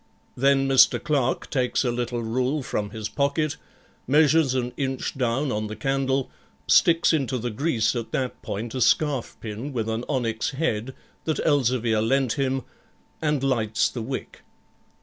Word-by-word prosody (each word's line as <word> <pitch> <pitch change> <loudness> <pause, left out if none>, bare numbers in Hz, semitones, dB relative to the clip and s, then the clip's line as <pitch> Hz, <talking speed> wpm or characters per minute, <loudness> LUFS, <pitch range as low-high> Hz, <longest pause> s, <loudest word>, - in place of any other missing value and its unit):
Then 135 +1 +3
Mr. 135 -1 +6
Clerk 145 -6 0
takes 125 -1 +1
a 125 - +1
little 120 0 -2
rule 130 +5 -1
from 105 -4 -3
his 110 0 -5
pocket, 145 +5 0 0.5
measures 150 0 +4
an 125 -1 -1
inch 135 -2 -3
down 130 +2 0
on 110 -1 -2
the 110 - -6
candle, 135 +3 -1 0.3
sticks 165 0 +4
into 135 -5 0
the 120 0 -3
grease 115 -2 0
at 115 -2 -4
that 130 -2 -2
point 110 +3 -5
a 130 - -3
scarf 140 +1 +1
pin 115 +6 -5
with 115 -3 -2
an 110 +1 -2
onyx 120 -3 -1
head 130 -5 -1 0.3
that 155 - -1
Elzevir 125 -6 +2
lent 130 +1 +1
him, 135 -2 -1 0.6
and 150 -3 0
lights 110 -5 +1
the 120 - -5
wick. 130 +4 -6
130 Hz, 155 wpm, -25 LUFS, 115-140 Hz, 0.6 s, Mr